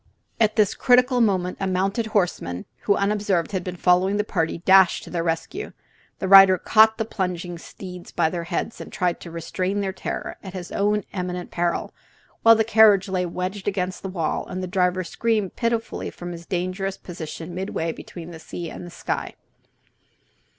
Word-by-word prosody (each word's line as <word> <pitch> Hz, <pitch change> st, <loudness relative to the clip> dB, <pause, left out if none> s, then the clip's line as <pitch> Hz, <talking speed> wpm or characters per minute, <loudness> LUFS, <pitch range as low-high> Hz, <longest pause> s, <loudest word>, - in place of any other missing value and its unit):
At 215 Hz, -2 st, +3 dB
this 210 Hz, -3 st, +3 dB
critical 250 Hz, 0 st, +4 dB
moment 185 Hz, -5 st, +1 dB
a 195 Hz, -, -1 dB
mounted 195 Hz, +5 st, 0 dB
horseman, 175 Hz, -, -1 dB, 0.2 s
who 200 Hz, -, +4 dB
unobserved 200 Hz, -3 st, 0 dB
had 190 Hz, -3 st, -2 dB
been 180 Hz, 0 st, -5 dB
following 180 Hz, +3 st, +3 dB
the 210 Hz, -, +1 dB
party, 165 Hz, -7 st, -1 dB
dashed 190 Hz, -1 st, +6 dB
to -, -, -11 dB
their 170 Hz, -, -1 dB
rescue. 165 Hz, -, -3 dB, 0.4 s
The 190 Hz, -, -3 dB
rider 195 Hz, -1 st, +9 dB
caught 220 Hz, +4 st, +5 dB
the 220 Hz, -, -1 dB
plunging 180 Hz, -4 st, -3 dB
steeds 180 Hz, 0 st, -10 dB
by 160 Hz, -2 st, +1 dB
their 170 Hz, -2 st, -4 dB
heads 175 Hz, +6 st, -3 dB
and -, -, -9 dB
tried 180 Hz, -2 st, -1 dB
to 170 Hz, -, -9 dB
restrain 185 Hz, +4 st, -2 dB
their 195 Hz, -1 st, -2 dB
terror, -, -, -5 dB
at 190 Hz, -1 st, -9 dB
his 180 Hz, -1 st, -7 dB
own 210 Hz, 0 st, +1 dB
eminent 180 Hz, -1 st, -4 dB
peril, 175 Hz, 0 st, -1 dB, 0.5 s
while 230 Hz, 0 st, +8 dB
the 220 Hz, -, +3 dB
carriage 215 Hz, -3 st, +5 dB
lay 180 Hz, -1 st, 0 dB
wedged 185 Hz, +3 st, -4 dB
against 185 Hz, -2 st, -2 dB
the 190 Hz, -, -5 dB
wall 170 Hz, -4 st, -2 dB
and 185 Hz, 0 st, -5 dB
the -, -, -1 dB
driver 180 Hz, 0 st, +1 dB
screamed 210 Hz, +2 st, -1 dB
pitifully 230 Hz, -1 st, -2 dB
from 175 Hz, 0 st, -8 dB
his 170 Hz, 0 st, -9 dB
dangerous 185 Hz, +2 st, -2 dB
position 170 Hz, -1 st, -8 dB
midway 175 Hz, -3 st, -2 dB
between 170 Hz, +1 st, -9 dB
sea 165 Hz, +1 st, -7 dB
and 175 Hz, -1 st, -8 dB
sky. -, -, -4 dB
185 Hz, 175 wpm, -23 LUFS, 175-205 Hz, 0.5 s, rider